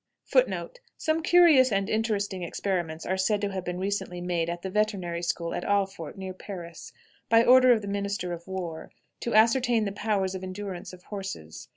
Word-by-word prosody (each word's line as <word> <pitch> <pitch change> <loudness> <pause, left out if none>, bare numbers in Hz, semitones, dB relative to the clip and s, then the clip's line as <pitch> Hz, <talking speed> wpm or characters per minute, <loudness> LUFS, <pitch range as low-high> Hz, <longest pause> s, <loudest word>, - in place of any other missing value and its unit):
Some 315 +1 0
curious 320 -7 +6
and 195 -1 +1
interesting 210 -4 -1
experiments 175 -2 -3
are 190 - -1
said 205 +2 +1
to 205 -1 -1
have 190 -1 -4
been 180 0 -4
recently 190 -1 -3
made 175 -2 -1
at 175 0 -5
the 190 - -3
veterinary 190 -5 -1
school 170 -1 -2
at - - -3
Alfort, 195 -4 -1
near 190 -1 -5
Paris, 175 -3 -9 0.4
by 230 0 +6
order 255 0 +7
of 225 -3 +3
the - - -5
minister 200 -3 -2
of 170 +1 -9
war, 175 -4 -5 0.3
to 235 - -2
ascertain 230 0 +4
the 200 - -2
powers 200 -2 -1
of 190 - -5
endurance 185 -1 -6
of 180 -1 -14
horses. 190 - -7
195 Hz, 180 wpm, -27 LUFS, 180-215 Hz, 0.4 s, order